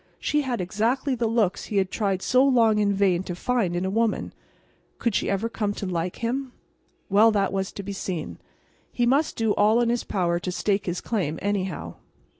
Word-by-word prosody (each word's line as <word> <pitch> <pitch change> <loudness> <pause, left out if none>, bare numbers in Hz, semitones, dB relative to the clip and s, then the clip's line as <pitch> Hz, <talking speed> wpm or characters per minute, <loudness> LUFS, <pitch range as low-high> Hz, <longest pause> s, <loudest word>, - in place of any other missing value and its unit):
She 295 - +1
had 250 -6 -2
exactly 230 +9 0
the 235 -2 0
looks 220 -5 0
he 210 - -3
had 190 -1 +1
tried 195 -4 -1
so 255 +1 +4
long 230 -6 +4
in 205 -1 +2
vain 190 -3 +2
to 180 -2 -5
find 205 -3 0
in 175 +2 -1
a 190 - -1
woman. 225 +1 0 0.6
Could 235 - 0
she - - 0
ever 200 +3 0
come 210 -3 -2
to - - -5
like 175 -1 -2
him? 255 +2 -2 0.5
Well, 210 +3 +5
that 200 -3 +1
was 190 0 -2
to 200 - -6
be 200 +1 -5
seen. 185 -4 -5 0.5
He 240 - +1
must 275 +6 +2
do 225 -2 +1
all 215 +3 +4
in 240 -1 +2
his 240 0 0
power 175 -3 0
to 180 +1 -4
stake 200 +1 -1
his 175 0 -2
claim, 175 -9 -2
anyhow. 195 -3 -3
205 Hz, 205 wpm, -25 LUFS, 190-235 Hz, 0.6 s, Well